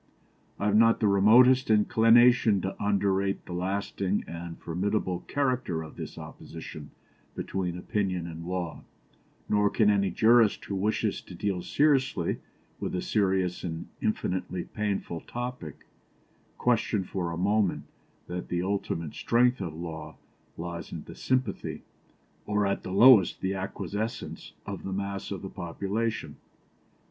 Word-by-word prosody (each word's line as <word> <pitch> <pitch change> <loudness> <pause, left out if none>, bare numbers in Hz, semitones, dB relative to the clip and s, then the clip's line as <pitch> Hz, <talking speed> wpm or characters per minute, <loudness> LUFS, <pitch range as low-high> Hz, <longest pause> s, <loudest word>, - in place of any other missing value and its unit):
I 100 - -3
have 105 0 +3
not 115 +1 +5
the 110 - +1
remotest 120 +7 +6
inclination 115 0 +5
to 95 - -3
underrate 100 -1 +1
the 90 - -7
lasting 95 +2 -1
and 85 0 -7
formidable 90 +1 -1
character 130 - 0
of 80 - -11
this - - -7
opposition 75 -2 -9 0.5
between 90 -2 -3
opinion 90 -2 -1
and 85 0 -7
law, 90 -2 -4 0.6
nor 105 -1 +3
can 105 -1 +3
any 100 -1 +2
jurist 110 +3 +4
who - - -5
wishes 105 +2 0
to 90 - -11
deal 95 -1 -1
seriously 135 - +1 0.4
with - - -3
a 90 - -1
serious 95 -3 0
and 85 -1 -5
infinitely 95 -3 -1
painful 100 -5 -3
topic, 120 - -6 0.7
question 110 -4 +1
for 90 -2 -3
a 85 - -4
moment 100 +1 +1 0.4
that 90 0 -5
the 90 0 -1
ultimate 90 -5 -2
strength 120 0 +2
of 85 -4 -4
law 80 -2 -7 0.4
lies 85 0 -6
in - - -6
the - - -10
sympathy, 130 0 -2 0.6
or 105 0 +1
at 100 - 0
the - - -6
lowest 105 -2 +7
the 95 +1 0
acquiescence, 100 +3 -4
of - - -6
the 95 - -4
mass 100 0 -3
of 100 -1 -5
the - - -4
population. 100 +5 -3
100 Hz, 135 wpm, -28 LUFS, 90-110 Hz, 0.7 s, lowest